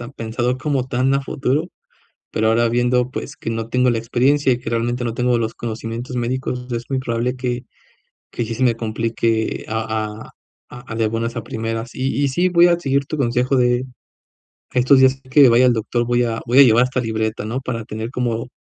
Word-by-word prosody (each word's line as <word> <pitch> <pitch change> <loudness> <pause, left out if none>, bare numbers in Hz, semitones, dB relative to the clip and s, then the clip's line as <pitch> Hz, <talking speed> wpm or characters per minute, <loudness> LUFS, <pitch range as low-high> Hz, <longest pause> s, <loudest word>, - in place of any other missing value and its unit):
pensado 120 +3 -2
como 135 -4 -1
tan 130 +2 +1
a 140 - 0
futuro, 140 +6 -1 0.6
pero, 110 0 +1
ahora 115 +1 +3
viendo, 125 +1 +1
pues, 140 - -6
que - - -6
no 115 0 -3
tengo 125 +2 +2
la 120 - +1
experiencia 130 +4 +2
y 120 - -4
que - - -6
realmente 120 +2 -1
no 115 -1 -2
tengo 125 0 +1
los 115 -1 -2
conocimientos 115 +2 -5
médicos, 125 +1 -3
es 120 0 -3
muy 135 -1 0
probable 125 0 -2
que 125 -1 -3 0.7
que 120 - -3
sí 115 - -4
se 125 - -3
me 120 -2 +3
complique 115 0 -1
a 110 -1 -3
a - - -29 0.6
a - - -4
de 110 -1 +1
buenas 115 +2 -3
a 115 - -3
primeras 115 +1 -4
y 135 +2 -1
y - - +2
sí, 175 +7 +1
voy 175 0 +5
a 170 -1 +2
seguir 140 -4 0
tu 155 +2 -5
consejo 125 0 +1
de 125 0 +2 0.9
estos 130 +2 +5
días 130 0 +4
que 135 -1 +6
vaya 120 +2 +5
al 125 - +5
doctor. 120 +1 -1
Voy 120 0 +2
a 115 -1 -2
voy 125 +3 +3
a - - +11
llevar 120 -1 +5
esta 130 0 -1
libreta, 110 -2 -2
no 120 +5 -3
para 115 -4 -4
tener 110 +3 -6
como 120 -1 -2
120 Hz, 205 wpm, -20 LUFS, 115-130 Hz, 0.9 s, a